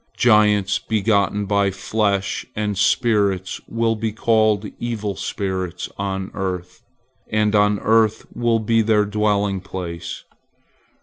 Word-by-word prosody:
Giants 105 -3 +4
begotten 105 -2 +1
by 100 0 +2
flesh 100 +1 -1
and 105 -1 -1
spirits 100 -3 +1
will 115 0 0
be 110 0 -2
called 110 -1 +2
evil 110 -4 -3
spirits 95 -3 -4
on 95 -1 -3
earth, 90 -2 -4 0.5
and 105 -1 +2
on 105 0 +4
the 100 - -7
earth 110 0 +2
will 120 -1 +2
be 115 +1 +2
their 105 -1 +3
dwelling 105 -2 0
place. 90 -3 -6
105 Hz, 120 wpm, -21 LUFS, 95-110 Hz, 0.5 s, Giants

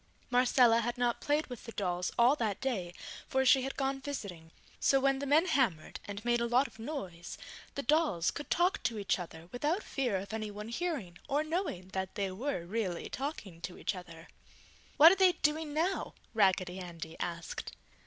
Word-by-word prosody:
Marcella 245 -2 +5
had 240 +2 -2
not 245 -1 0
played 295 +2 +1
with 245 -2 -9
the 230 - -7
dolls 180 -2 -1
all 245 +4 +6
that 220 -8 -1
day, 205 -10 -2 0.4
for 265 0 +1
she 265 +1 +6
had 270 +1 -4
gone 270 0 -1
visiting; 200 - -6 0.3
so 270 - +4
when 270 0 +2
the 280 - -3
men 305 +5 +5
hammered 225 - 0
and 205 +2 -7
made 240 0 +2
a 235 - +1
lot 250 +3 +4
of 225 - -11
noise, 195 - -6 0.4
the 280 - -3
dolls 295 - +2
could 290 - -7
talk 355 +3 +2
to 230 - -1
each 200 -2 0
other 165 -1 -8
without 300 - 0
fear 245 -8 -1
of 195 +3 -6
anyone 210 -1 -4
hearing 235 - -3
or 290 +2 +2
knowing 310 - -3 0.2
they 200 -3 -1
were 205 -3 -3
really 185 -3 -2
talking 230 - -5
to 180 - -6
each - - -1
other. 170 -3 -10 0.7
"What 320 +3 +10
are - - +4
they 370 -1 +7
doing 305 -1 0
now?" 330 +6 -1 0.2
Raggedy 190 -3 +2
Andy 165 -2 -7
asked. 170 -1 -4
235 Hz, 185 wpm, -32 LUFS, 185-280 Hz, 0.7 s, What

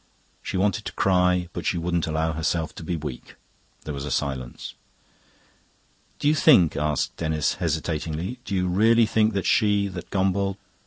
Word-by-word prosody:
She 95 - -4
wanted 100 0 0
to - - -5
cry, 90 -2 +2
but 85 - -5
she 90 - 0
wouldn't 85 -1 -1
allow 80 +1 0
herself 80 0 -1
to - - -9
be 85 +2 -2
weak. 75 -6 -7 0.5
There 75 - -5
was 70 -1 -5
a 75 - -4
silence. 65 -4 -3 1.4
"Do - - -1
you 150 - +5
think," 130 - +5
asked 75 -1 -1
Denis 80 -2 0
hesitatingly 80 - -2
"do 100 - -3
you 90 -1 +1
really 110 +6 +4
think 110 0 +2
that 100 -1 -2
she...that 100 -4 +1
Gombauld..." 95 0 0
90 Hz, 160 wpm, -24 LUFS, 80-100 Hz, 1.4 s, you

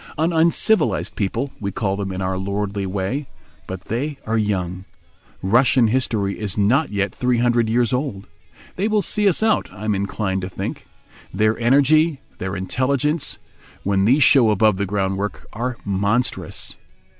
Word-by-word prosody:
An 165 +3 +1
uncivilised 170 +3 +2
people, 115 +7 -2
we 100 -1 -3
call 95 0 -1
them 100 -1 -3
in 95 0 -3
our 95 0 -1
lordly 100 +1 -2
way, 100 +9 -2 0.4
but 95 -1 -6
they 135 +8 -3
are 110 - -1
young. 95 -4 -1 0.6
Russian 120 +3 +4
history 110 -5 0
is 105 -3 -2
not 125 +10 +3
yet 100 -1 -1
three 125 -1 +1
hundred 120 -1 +2
years 120 0 +1
old. 125 -7 -2 0.5
They 195 +3 +1
will 215 -2 +1
see 210 -1 +2
us 190 - 0
out, 220 -1 +2
I 105 +1 -8
am 105 - +1
inclined 100 -1 -2
to 90 - -4
think. - - -6 0.4
Their 110 +1 +2
energy, 145 +5 +4 0.2
their 95 +1 -3
intelligence—when 130 - -2
these 135 +7 +5
show 125 -6 +6
above 105 -1 +3
the 100 0 -1
groundwork—are 105 +5 -3
monstrous. 100 +5 -1
110 Hz, 150 wpm, -21 LUFS, 100-130 Hz, 0.6 s, show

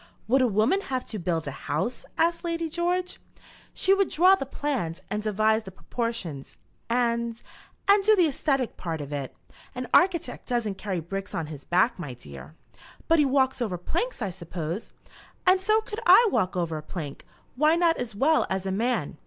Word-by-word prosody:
"Would 260 +4 +4
a 255 - +4
woman 225 - +2
have 260 -9 -3
to 215 - -4
build 165 -3 -1
a - - -2
house?" 160 - -3
asked 335 +1 +1
Lady 335 -2 -2
George. 355 +2 -1 0.5
"She 385 - +2
would 390 -1 +2
draw 365 +4 +5
the 385 -9 0
plans, 260 - -3
and 210 - -1
devise 215 +1 +2
the 205 - -10
proportions, 190 - -5 0.3
and 235 -1 0 0.5
and 400 0 +6
do 430 +2 +6
the 365 - +4
æsthetic 275 -3 -1
part 165 -3 -4
of 145 0 -6
it. 140 -3 -4 0.4
An 250 0 -4
architect 345 -8 +2
doesn't 220 -6 -1
carry 190 -4 -2
bricks 195 +4 -5
on 165 - -2
his 140 -2 -11
back, 185 +6 +2
my 145 -8 -6
dear." 70 - -12 0.5
"But 330 0 +4
he 295 - +5
walks 265 -1 +2
over 200 -7 -1
planks, 345 - -2
I 195 - -2
suppose." 170 +2 -5 0.5
"And 370 0 +5
so 430 +3 +3
could 430 0 -6
I 475 - +8
walk 185 0 0
over 165 -3 -1
a - - -8
plank; 150 -3 -7 0.3
why 305 +5 +4
not 340 -1 +3
as 240 -4 -4
well 305 +9 +3
as 190 0 -2
a 190 - -1
man? 215 - -1
235 Hz, 185 wpm, -26 LUFS, -, 0.5 s, I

